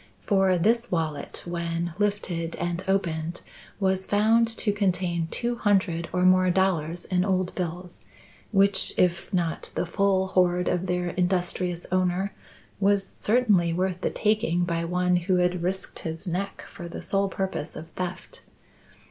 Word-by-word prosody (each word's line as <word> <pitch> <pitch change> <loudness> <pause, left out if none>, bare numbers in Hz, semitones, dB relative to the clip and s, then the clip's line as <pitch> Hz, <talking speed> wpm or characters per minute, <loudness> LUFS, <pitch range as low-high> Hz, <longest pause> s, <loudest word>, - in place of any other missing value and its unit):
For 190 -3 +3
this 230 +7 +2
wallet, 160 -4 -2
when 170 -1 -3
lifted 185 -5 -1
and 175 +1 -3
opened, 170 -3 -1 0.4
was 190 -1 0
found 220 +3 +4
to 225 -2 0
contain 180 -4 0
two 240 +4 -2
hundred 190 -6 +1
or 180 0 0
more 185 0 +5
dollars 175 -3 0
in 180 -1 +1
old 185 -2 0
bills, 175 0 -5 0.5
which, 195 -1 +4
if 170 0 +1
not 170 -4 -1
the - - 0
full 190 +1 +1
hoard 180 -1 +2
of 180 +1 0
their 180 0 0
industrious 180 -1 -1
owner, 185 +1 +1 0.5
was 200 0 +3
certainly 205 -9 +2
worth 185 +1 -1
the - - +1
taking 210 -5 +1
by 170 -1 -1
one 180 +1 +2
who 180 +2 +1
had 180 0 +1
risked 190 +2 -3
his 160 +3 -5
neck 185 +3 -3
for 175 - -7
the 170 - -7
sole 195 0 +1
purpose 190 -5 -4
of 160 - -8
theft. 180 +1 -6
180 Hz, 150 wpm, -26 LUFS, 175-195 Hz, 0.5 s, more